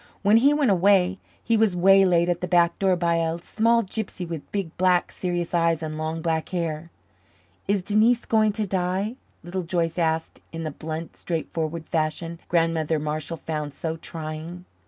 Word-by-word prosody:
When 205 Hz, +2 st, +6 dB
he 275 Hz, +5 st, +5 dB
went 290 Hz, -6 st, +3 dB
away, 190 Hz, 0 st, +3 dB, 0.2 s
he 230 Hz, -, +2 dB
was 215 Hz, -4 st, +3 dB
waylaid 180 Hz, -1 st, +5 dB
at 175 Hz, 0 st, 0 dB
the 180 Hz, -, -2 dB
back 170 Hz, -1 st, +3 dB
door 190 Hz, -2 st, +3 dB
by 170 Hz, -1 st, +1 dB
a 165 Hz, 0 st, 0 dB
small 230 Hz, +6 st, +1 dB
gypsy 195 Hz, -3 st, -5 dB
with 165 Hz, -3 st, -7 dB
big, 195 Hz, -5 st, -3 dB
black, 180 Hz, -1 st, +2 dB
serious 175 Hz, -2 st, -3 dB
eyes 165 Hz, -1 st, +2 dB
and 155 Hz, -1 st, -4 dB
long 160 Hz, +1 st, -3 dB
black 160 Hz, -2 st, -1 dB
hair. 165 Hz, -2 st, -3 dB, 0.8 s
"Is 200 Hz, -2 st, +1 dB
Denise 220 Hz, +4 st, +3 dB
going 215 Hz, -1 st, +3 dB
to 215 Hz, 0 st, -1 dB
die?" 190 Hz, +4 st, -1 dB, 0.3 s
Little 180 Hz, +2 st, -3 dB
Joyce 170 Hz, -1 st, -1 dB
asked 160 Hz, -1 st, -1 dB
in 165 Hz, 0 st, -5 dB
the 155 Hz, -, -3 dB
blunt, 160 Hz, +3 st, -6 dB
straightforward 160 Hz, -1 st, -3 dB
fashion 165 Hz, +1 st, -2 dB
Grandmother 165 Hz, -2 st, +1 dB
Marshall 155 Hz, +2 st, -3 dB
found 150 Hz, -3 st, -4 dB
so 160 Hz, +1 st, -3 dB
trying. 160 Hz, +2 st, -7 dB
170 Hz, 170 wpm, -24 LUFS, 160-195 Hz, 0.8 s, When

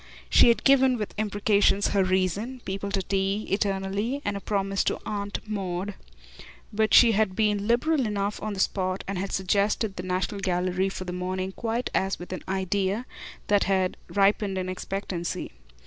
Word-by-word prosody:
She -, -, +7 dB
had 235 Hz, -, +3 dB
given, 265 Hz, -2 st, +5 dB
with 210 Hz, -2 st, -4 dB
imprecations, 205 Hz, -1 st, +2 dB
her 200 Hz, -1 st, +2 dB
reason 190 Hz, +7 st, -1 dB
people 195 Hz, +1 st, -3 dB
to 195 Hz, -1 st, -1 dB
tea, 195 Hz, +2 st, -1 dB
eternally, 200 Hz, +5 st, -1 dB
and 205 Hz, -, -1 dB
a -, -, -3 dB
promise 195 Hz, -1 st, -1 dB
to -, -, 0 dB
Aunt 205 Hz, -1 st, -3 dB
Maud; 195 Hz, -1 st, -3 dB, 0.8 s
but 220 Hz, 0 st, +1 dB
she 235 Hz, -2 st, +8 dB
had 210 Hz, -3 st, +1 dB
been 210 Hz, -1 st, +1 dB
liberal 255 Hz, +3 st, +2 dB
enough 205 Hz, 0 st, -2 dB
on 215 Hz, 0 st, -3 dB
the 195 Hz, -, -6 dB
spot 185 Hz, -1 st, 0 dB
and 195 Hz, -2 st, -3 dB
had 195 Hz, +1 st, -3 dB
suggested 200 Hz, +2 st, 0 dB
the -, -, -2 dB
National 185 Hz, +3 st, -2 dB
Gallery 185 Hz, 0 st, 0 dB
for 190 Hz, -, -6 dB
the 180 Hz, -1 st, -5 dB
morning 185 Hz, +1 st, -3 dB
quite 230 Hz, +4 st, -3 dB
as 190 Hz, 0 st, 0 dB
with 175 Hz, +1 st, -8 dB
an 185 Hz, -, -6 dB
idea 190 Hz, +4 st, -1 dB, 0.4 s
that 205 Hz, -1 st, +3 dB
had 190 Hz, -1 st, +1 dB
ripened 200 Hz, 0 st, +2 dB
in 185 Hz, 0 st, -2 dB
expectancy. 185 Hz, -2 st, -4 dB
200 Hz, 170 wpm, -26 LUFS, 190-210 Hz, 0.8 s, she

